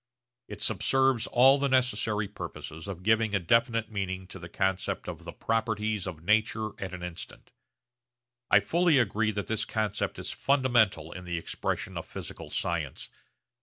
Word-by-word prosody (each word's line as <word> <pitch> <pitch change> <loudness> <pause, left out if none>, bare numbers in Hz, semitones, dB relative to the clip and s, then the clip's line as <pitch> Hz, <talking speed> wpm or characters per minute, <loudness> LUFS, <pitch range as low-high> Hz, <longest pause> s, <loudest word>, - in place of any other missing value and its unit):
It - - -6
subserves 135 -3 +2
all 135 +3 +6
the 140 0 +1
necessary 120 -5 +1
purposes 80 -3 -8
of 90 -2 -6
giving 110 0 +3
a - - +3
definite 115 +4 +2
meaning 95 -2 -3
to 95 - -8
the 85 0 -9
concept 95 +1 -1
of - - -7
the - - -6
properties 110 -3 -1
of 80 -4 -7
nature 110 +2 +2
at 95 -1 -4
an 90 - -8
instant. 90 -1 -8 1.0
I - - +6
fully 170 -3 +3
agree 110 -2 +2
that 100 -1 -2
this 110 -1 0
concept 110 0 -2
is - - -4
fundamental 120 - +2
in 90 - -8
the 85 -1 -3
expression 80 - -3
of - - -9
physical - - -7
science. 80 -6 -3
105 Hz, 160 wpm, -29 LUFS, 95-115 Hz, 1.0 s, all